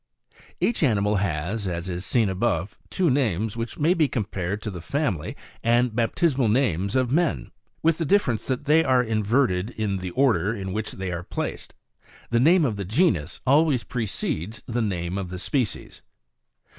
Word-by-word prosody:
4. - - -28 0.2
Each 235 - +1
animal 105 -7 +2
has, 95 +3 -2
as 85 0 -3
is 90 0 -4
seen 115 +1 +2
above, 95 -1 -1
two 180 -6 +1
names, 110 -6 0
which 115 0 -5
may 160 +4 +3
be 160 -5 +2
compared 100 -5 -3
to 105 - -3
the 90 -3 -7
family 115 - -2 0.3
and 120 0 +2
baptismal 130 +2 +1
names 100 - +1
of 130 -2 +1
men, 165 +1 0 0.3
with 165 0 +3
the 165 - 0
difference 145 - +1
that 130 +1 -2
they 155 +2 +5
are 130 -3 +3
inverted 110 -3 +1
in 105 -5 -2
the 90 -1 -5
order 110 -2 +2
in 95 -2 -5
which 110 +1 -3
they 95 -1 -4
are 85 -1 -3
placed; 90 - -5 0.6
the 115 - +3
name 165 +5 +5
of 110 -6 -1
the 100 - -3
genus 100 - +1
always 140 -2 +3
precedes 110 - -3
the 120 0 -2
name 90 -3 -2
of 95 -2 -5
the 90 - -5
species. 120 +4 -2
110 Hz, 175 wpm, -24 LUFS, 95-135 Hz, 0.6 s, they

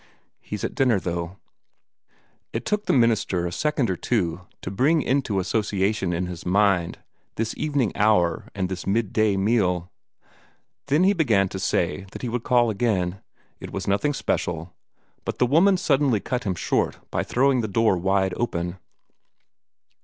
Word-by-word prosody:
"He's - - -6
at - - -2
dinner, 125 -6 +2
though." 85 0 -4 1.2
It - - -3
took 210 0 -1
the - - +3
young 130 - +5
minister 105 -6 +1
a 85 - -2
second 150 +1 0
or 95 - -1
two 90 -4 -1 0.2
to 90 - -4
bring 145 +10 +2
into 125 -7 0
association 100 0 0
in 90 +1 -1
his 90 -1 -7
mind 95 -2 +2 0.4
this 110 0 -2
evening 145 -7 0
hour 100 -6 +2
and 95 -2 -1
this 90 -1 -6
midday 110 -1 +1
meal. 95 -4 +1 1.0
Then 145 +5 +3
he 195 +2 +5
began 110 - +2
to 95 - -5
say 95 +1 -1
that - - -8
he 125 - -2
would 120 +1 -2
call 120 -1 +3
again 100 -4 -1 0.4
it - - -8
was 95 -1 -5
nothing 120 +9 +1
special 85 -6 -2 0.5
but - - -4
the - - +3
woman 175 +9 +4
suddenly 135 - +2
cut 125 +4 -3
him 95 -3 -1
short - - 0
by - - 0
throwing 130 0 +2
the 110 - -2
door 110 0 +2
wide 95 +1 +1
open. 90 -5 -2
100 Hz, 160 wpm, -24 LUFS, 90-125 Hz, 1.2 s, young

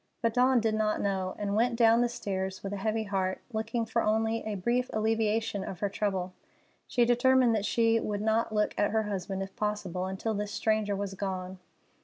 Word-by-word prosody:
But 230 -1 +2
Dawn 255 +1 +4
did 225 -1 +1
not 215 0 +1
know, 190 -2 -1
and 205 -1 -2
went 235 +2 +2
down 230 0 +5
the 245 - +2
stairs 190 -5 -4
with 200 0 -4
a - - -3
heavy 220 +2 -1
heart, 190 -2 -1
looking 225 +2 -1
for 230 +1 0
only 220 +1 +1
a 215 -1 -2
brief 240 +6 0
alleviation 220 -1 0
of 185 - -6
her 205 - +1
trouble. 190 -2 -2 0.5
She 240 -2 +2
determined 245 0 +4
that 210 -2 0
she 230 0 +3
would 210 -1 -3
not 220 +1 +1
look 210 -1 +1
at 205 - +3
her 220 +1 +1
husband, 195 -1 -3
if 195 0 -10
possible, 200 -4 -2
until 190 +4 -2
this 205 0 -3
stranger 215 -2 0
was 200 0 -3
gone. 185 -1 -4
215 Hz, 200 wpm, -29 LUFS, 195-225 Hz, 0.5 s, down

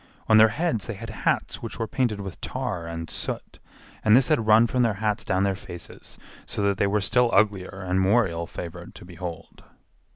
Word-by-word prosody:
On 110 - +6
their 110 0 +8
heads 145 - -1
they 115 - -4
had 110 +2 -7
hats 105 - -1
which 115 -2 -6
were 115 - -1
painted 115 -3 -1
with 95 -3 -8
tar 110 -10 -3
and 85 0 -5
soot, - - -5 0.4
and 110 0 +6
this 125 0 +4
had 110 - +2
run 110 +2 +7
from 125 +2 0
their 115 -4 +2
hats 105 0 -1
down 95 +1 +1
their 100 -1 +2
faces, 90 -2 -8 0.3
so 105 - -2
that 100 -1 +1
they 100 - +3
were 105 +1 +1
still 125 +4 +3
uglier 95 -2 +1
and 90 +1 +2
more 105 +3 +4
ill 85 -1 -4
favored 85 -2 -8
to - - -11
behold. 85 -1 -8
105 Hz, 205 wpm, -25 LUFS, 95-115 Hz, 0.4 s, their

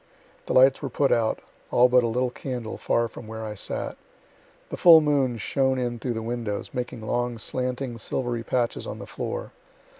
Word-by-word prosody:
The - - -1
lights 130 +1 +6
were 140 - -3
put 135 +2 +1
out, 115 -2 +1 0.3
all 125 +1 +5
but 125 0 +4
a - - +1
little 125 +2 0
candle, 125 -4 -5
far 115 0 +1
from 110 0 -11
where 110 0 -6
I 105 - -4
sat. 105 - -4 0.7
The - - -4
full 170 -2 +9
moon 140 -5 +1
shone 130 +5 +1
in 120 -2 -2
through 125 +1 -2
the 110 - -3
windows, 115 -3 -3
making 125 -2 -4
long, 120 +2 -1
slanting 125 +1 -3
silvery 120 0 -2
patches 120 +1 -1
on - - -5
the - - -8
floor. - - -5
120 Hz, 185 wpm, -25 LUFS, 115-130 Hz, 0.7 s, full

